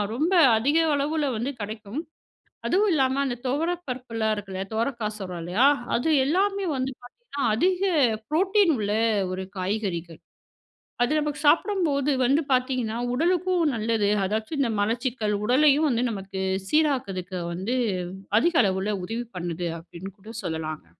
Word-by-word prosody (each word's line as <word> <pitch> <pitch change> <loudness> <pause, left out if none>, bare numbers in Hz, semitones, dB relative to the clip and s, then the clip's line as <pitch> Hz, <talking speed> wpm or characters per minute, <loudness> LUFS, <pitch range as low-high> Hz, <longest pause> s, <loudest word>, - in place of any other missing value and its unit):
ரொம்ப 315 +8 0 0.3
அதிக 280 +8 +2 0.2
அளவுல 295 +2 0
வந்து 255 +5 -2
கிடைக்கும். 215 +5 -5 0.7
அதுவும் 410 +4 +3
இல்லாம 265 -3 +2
அந்த 260 -3 -1
துவரை 310 +7 0
பருப்புலாம் 230 -4 -2
இருக்குல்ல, 195 -2 -5
துவரைக்கா 230 0 -1
சொல்றோம் 180 -3 -6
இல்லயா, 185 +10 +3 0.3
அது 250 +7 +1
எல்லாமே 390 +7 +1
வந்து 260 +1 -2
பார்த்தீங்கன்னா, 285 - -8
அதிக 365 +6 +1 0.5
புரோட்டீன் 380 +3 +3
உள்ள 205 -2 -1 0.4
ஒரு 185 +1 -3 0.2
காய்கறிகள். 185 -4 -3 0.9
அது 245 - 0
நமக்கு 295 -1 -3
சாப்பிடும்போது 305 -5 +2
வந்து 275 +6 +3
பார்த்தீங்கன்னா, 250 -3 0 0.2
உடலுக்கும் 355 +4 +1
நல்லது. 220 -2 +1 0.2
அதாச்சும் 220 +9 -2
இந்த 240 -5 +1
மலச்சிக்கல் 230 0 -1
உடலையும் 290 +4 +4
வந்து 240 0 +1
நமக்கு 195 -1 -5 0.3
சீராக்குதுக்கு 200 - 0
வந்து 190 +9 -2 0.6
அதிக 340 +5 +2
அளவுல 195 +2 0
உதவி 230 +5 -4
பண்ணுது, 175 -1 -3
அப்பிடின்னு 175 +3 -10
கூட 215 +3 -10
சொல்லலாங்க. 160 - -4
245 Hz, 130 wpm, -25 LUFS, 200-295 Hz, 0.9 s, உடலையும்